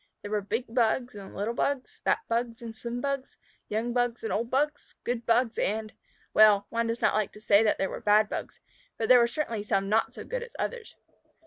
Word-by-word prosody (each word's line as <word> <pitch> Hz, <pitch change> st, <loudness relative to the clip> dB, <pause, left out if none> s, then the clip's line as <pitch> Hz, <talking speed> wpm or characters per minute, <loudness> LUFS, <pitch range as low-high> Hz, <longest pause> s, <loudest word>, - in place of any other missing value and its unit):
There 205 Hz, -, -6 dB
were 210 Hz, -1 st, +1 dB
big 225 Hz, +5 st, -2 dB
Bugs 245 Hz, +1 st, +1 dB
and 200 Hz, -2 st, -10 dB
little 210 Hz, +4 st, -2 dB
Bugs, 275 Hz, +2 st, -2 dB
fat -, -, +2 dB
Bugs 235 Hz, +1 st, -2 dB
and 225 Hz, -1 st, -7 dB
slim 235 Hz, +2 st, -5 dB
Bugs, 275 Hz, -1 st, -3 dB, 0.3 s
young 225 Hz, +3 st, -1 dB
Bugs 245 Hz, -1 st, 0 dB
and 220 Hz, -, -2 dB
old 230 Hz, +2 st, -1 dB
Bugs, 290 Hz, +3 st, -1 dB
good 240 Hz, -1 st, -3 dB
Bugs 235 Hz, 0 st, +2 dB
and 215 Hz, +1 st, -1 dB, 0.4 s
well, 210 Hz, -2 st, +6 dB
one 230 Hz, 0 st, 0 dB
does 230 Hz, +1 st, -2 dB
not -, -, +3 dB
like 215 Hz, -2 st, 0 dB
to -, -, -12 dB
say 205 Hz, -1 st, +5 dB
that 220 Hz, -, +2 dB
there 195 Hz, -, 0 dB
were -, -, -6 dB
bad 210 Hz, +1 st, +4 dB
Bugs, -, -, -6 dB, 0.4 s
but 225 Hz, -, -2 dB
there 250 Hz, -1 st, +9 dB
were 235 Hz, -, +4 dB
certainly 235 Hz, -4 st, -2 dB
some 195 Hz, -2 st, 0 dB
not 220 Hz, +2 st, +1 dB
so -, -, -7 dB
good -, -, -4 dB
as 475 Hz, 0 st, -9 dB
others. 480 Hz, -3 st, -4 dB
230 Hz, 220 wpm, -28 LUFS, 215-245 Hz, 0.4 s, there